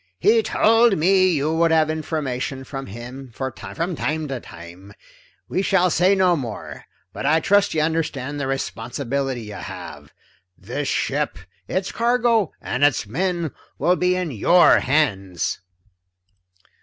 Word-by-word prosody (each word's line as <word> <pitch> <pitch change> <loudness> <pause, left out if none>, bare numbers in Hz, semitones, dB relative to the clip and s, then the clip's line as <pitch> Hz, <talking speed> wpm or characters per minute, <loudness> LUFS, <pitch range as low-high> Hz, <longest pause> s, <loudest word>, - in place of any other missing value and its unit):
"He 225 - +4
told 225 0 +3
me 185 +3 +4
you 155 -2 0
would 165 +1 +3
have 160 -1 +3
information 140 -4 -3
from 135 0 -7
him 125 +5 -9
for 130 -1 -3
me, - - -9
from 170 +1 -2
time 155 +1 -2
to 135 -2 -3
time. 90 +2 -12 0.5
We 185 - -1
shall 185 -2 +2
say 185 +4 +4
no 185 -2 +3
more, 120 -8 -6 0.3
but - - -3
I 160 +2 +4
trust 200 +1 +2
you 155 - +2
understand 145 -3 -2
the 140 - -2
responsibility 135 0 -3
you 105 -1 -8
have? - - -9 0.5
This - - -4
ship, - - -1 0.3
its 190 0 -2
cargo, 235 -4 +2
and 135 - -2
its 145 -6 +3
men 170 - -2 0.3
will 175 +6 +2
be 180 0 +1
in 180 -4 -2
your 170 - +5
hands." 100 - 0
155 Hz, 145 wpm, -22 LUFS, 130-180 Hz, 0.5 s, your